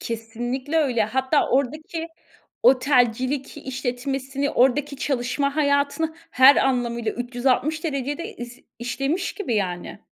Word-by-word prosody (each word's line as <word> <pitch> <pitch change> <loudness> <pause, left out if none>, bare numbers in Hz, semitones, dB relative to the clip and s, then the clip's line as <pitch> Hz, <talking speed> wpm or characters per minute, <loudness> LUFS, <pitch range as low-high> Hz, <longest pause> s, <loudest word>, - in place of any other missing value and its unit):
Kesinlikle 240 +6 -4
öyle. 245 -8 +2
Hatta 265 +6 +1
oradaki 305 +5 -1 0.6
otelcilik 255 0 +2
işletmesini, 265 +2 -3
oradaki 280 +2 +2
çalışma 275 +1 -1
hayatını 290 +2 +1 0.2
her 265 +2 +7
anlamıyla 235 -4 0
360 255 +6 -1
derecede 290 +1 -3
iz 240 +1 -9 0.2
işlemiş 275 +9 -2
gibi 350 - -2
yani. 185 -1 -3
265 Hz, 100 wpm, -23 LUFS, 245-285 Hz, 0.6 s, her